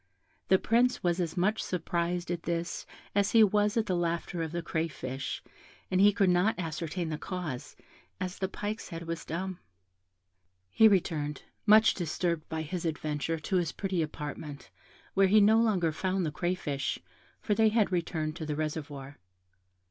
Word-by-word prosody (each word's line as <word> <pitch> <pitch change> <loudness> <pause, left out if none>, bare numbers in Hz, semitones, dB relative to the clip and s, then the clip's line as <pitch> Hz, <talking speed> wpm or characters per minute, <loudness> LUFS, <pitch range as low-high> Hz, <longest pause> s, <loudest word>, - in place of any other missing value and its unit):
The 190 - +6
Prince 245 +5 +2
was 175 0 +1
as 175 0 -2
much 210 +5 +2
surprised 175 0 -2
at 175 -1 -2
this 170 0 -3 0.3
as 200 0 +2
he 225 -1 +8
was 210 +1 +2
at 225 - +2
the 185 -4 0
laughter 170 0 -1
of 160 -1 -3
the 170 0 -3
crayfish, 150 -5 -3 0.5
and 185 0 +3
he 205 +1 +7
could 200 -2 +2
not 180 +5 +2
ascertain 165 0 -3
the 155 -1 -3
cause, 175 -9 -5 0.4
as 185 +1 -4
the 190 - 0
pike's 210 +3 -5
head 165 0 -6
was 165 0 -4
dumb. 185 +3 -4 1.1
He 220 - +7
returned, 160 -7 0 0.2
much 215 +1 +7
disturbed 170 -1 -2
by 160 -1 -2
his 170 +3 -4
adventure, 155 0 -2
to 190 - 0
his 170 -4 0
pretty 190 -3 -1
apartment, 150 -1 -6 0.4
where 195 0 +5
he 215 +3 +6
no 215 +2 +6
longer 195 -8 +2
found 185 +3 -1
the 155 - -1
crayfish, 150 -4 -2 0.4
for 210 - 0
they 220 +1 +4
had 215 -2 +2
returned 160 -3 -1
to 160 - -4
the 150 - -1
reservoir. 145 -2 -5
175 Hz, 165 wpm, -30 LUFS, 160-195 Hz, 1.1 s, he